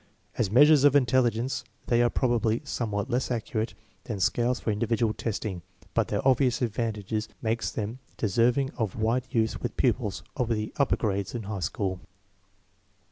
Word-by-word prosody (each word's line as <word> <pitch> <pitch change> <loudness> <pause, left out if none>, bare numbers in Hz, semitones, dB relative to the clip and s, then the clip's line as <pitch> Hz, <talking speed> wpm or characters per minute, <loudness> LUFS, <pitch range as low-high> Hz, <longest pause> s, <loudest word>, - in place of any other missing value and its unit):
As 100 - 0
measures 145 +5 +6
of 145 -2 +6
intelli 130 -3 +4
gence 120 +3 -3 0.2
they 120 0 +3
are 120 - +4
probably 120 -2 +1
somewhat 115 -4 -3
less 125 +2 0
accurate 115 -1 -2 0.3
than 105 -4 -4
scales 120 +7 +1
for 110 - -1
individual 115 +1 +1
testing, 105 -5 -3 0.3
but - - +2
their - - -1
obvious 130 -1 +3
advan 115 -2 -1
tages 105 +1 -3
make 115 0 -1
them 110 +3 -3 0.2
deserving 120 +6 +2
of 110 -5 -1
wide 115 +3 0
use 110 -4 0
with - - -4
pupils - - 0
of 120 -2 -1
the 110 -2 -1
upper 140 - +3
grades 100 -2 -2
and 115 -3 -4
high 100 -1 -4
school. 95 +2 -2
115 Hz, 165 wpm, -27 LUFS, 105-125 Hz, 0.3 s, measures